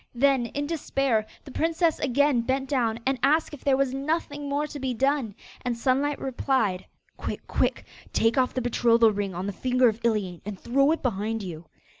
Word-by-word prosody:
Then, 265 -1 +3
in 285 +4 -3
despair, 275 -8 0 0.2
the 275 - -10
princess 325 +2 +1
again 280 -1 +2
bent 265 +3 -1
down 235 -5 0
and 265 -1 0
asked 305 +3 +2
if 295 - -10
there 270 -2 +3
was 270 -1 +1
nothing 290 0 -2
more 285 +1 0
to 295 -1 -7
be 260 -2 -2
done, 270 -4 0 0.3
and 245 -2 -2
Sunlight 275 +4 +1
replied 250 -7 -1 0.3
'Quick, - - -5
quick, - - 0 0.3
take 225 +1 +2
off 255 -2 +1
the 255 - 0
betrothal 235 -1 +4
ring 200 -3 -3
on 180 +2 -3
the 200 - -3
finger 255 +3 +3
of 220 +1 -5
Iliane 205 -7 0
and 200 -2 -6
throw 275 +4 +2
it 325 - -1
behind 220 -2 -1
you. 170 -3 -7
255 Hz, 190 wpm, -26 LUFS, 225-280 Hz, 0.3 s, betrothal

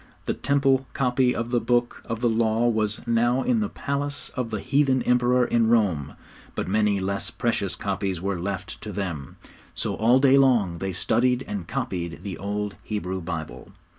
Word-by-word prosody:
The - - 0
Temple 135 -2 +2
copy 125 -1 +2
of 115 +1 -3
the 120 - +3
Book 120 +1 0
of 115 -1 -4
the 120 - +3
Law 115 0 +2
was 110 -2 0
now 120 +2 +2
in 245 -3 +2
the 210 -2 -1
palace 145 0 -3
of 125 -3 -4
the 110 -2 -3
heathen 135 +2 +2
Emperor 125 0 +3
in 115 -1 +2
Rome, 90 -12 +2 0.4
but - - -2
many 105 0 +2
less 100 +1 -2
precious 100 -6 -1
copies 95 -2 -2
were 95 0 -2
left 95 +1 -5
to 105 - -6
them. 90 -9 -4 0.4
So - - -2
all 120 +4 +4
day 135 0 +5
long 110 -11 +3
they 95 +2 -2
studied 125 +7 +1
and 95 -5 -4
copied 95 -10 -4
the 95 -5 -5
old 105 +1 -3
Hebrew 95 -3 -3
Bible. 80 -2 -6
115 Hz, 175 wpm, -25 LUFS, 100-125 Hz, 0.4 s, day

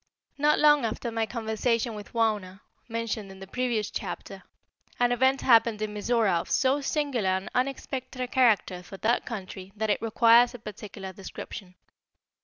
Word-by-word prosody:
Not 300 +1 +4
long 295 -2 +5
after 230 +1 -3
my 225 -1 -1
conversation 230 +1 -1
with 210 -1 -9
Wauna, 210 -5 -1 0.3
mentioned 225 -3 -3
in 190 0 -12
the 195 - -8
previous 230 0 -1
chapter, - - -6 0.6
an 245 0 +3
event 260 +2 +3
happened 230 -3 +4
in 215 -1 -3
Mizora 210 -4 +1
of - - -12
so 270 +2 +2
singular 275 -8 0
and 190 +1 -1
unexpected 260 0 -3
a 250 - -1
character 225 -8 +2
for 195 +2 -11
that 230 +5 0
country 195 -3 -7
that 220 0 0
it - - 0
requires 230 +2 +5
a - - -6
particular 205 -3 -8
description. 185 0 -9
225 Hz, 160 wpm, -27 LUFS, 205-245 Hz, 0.6 s, long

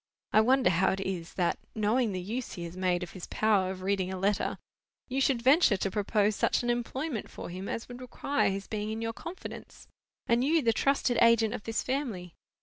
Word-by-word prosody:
I 215 - +7
wonder 255 -3 +4
how 185 +2 +3
it 190 - -4
is 185 -3 -4
that, 175 -2 0 0.2
knowing 220 +2 +1
the 185 - -3
use 225 +7 -4
he 175 - -6
has 170 +1 -7
made 180 -1 0
of 175 - -7
his 185 - -8
power 205 -4 +2
of 185 -1 -6
reading 190 -1 0
a 190 - -4
letter, 200 +2 0 0.5
you 265 +1 -1
should 260 -3 +2
venture 265 - +5
to 195 0 -2
propose 210 0 +1
such - - +1
an 240 - +1
employment 240 +1 -3
for - - -8
him 185 +3 -6
as 230 - -4
would 245 0 -9
require 280 +2 0
his 195 0 -3
being 210 -1 -3
in 220 +1 -3
your 225 0 -2
confidence, 345 +10 -9 0.4
and 235 +1 +2
you 310 +2 +3
the 230 -1 +3
trusted 270 -1 +1
agent 230 -1 +5
of 215 - -6
this 225 0 -1
family. 230 - -3
215 Hz, 215 wpm, -29 LUFS, 190-245 Hz, 0.5 s, I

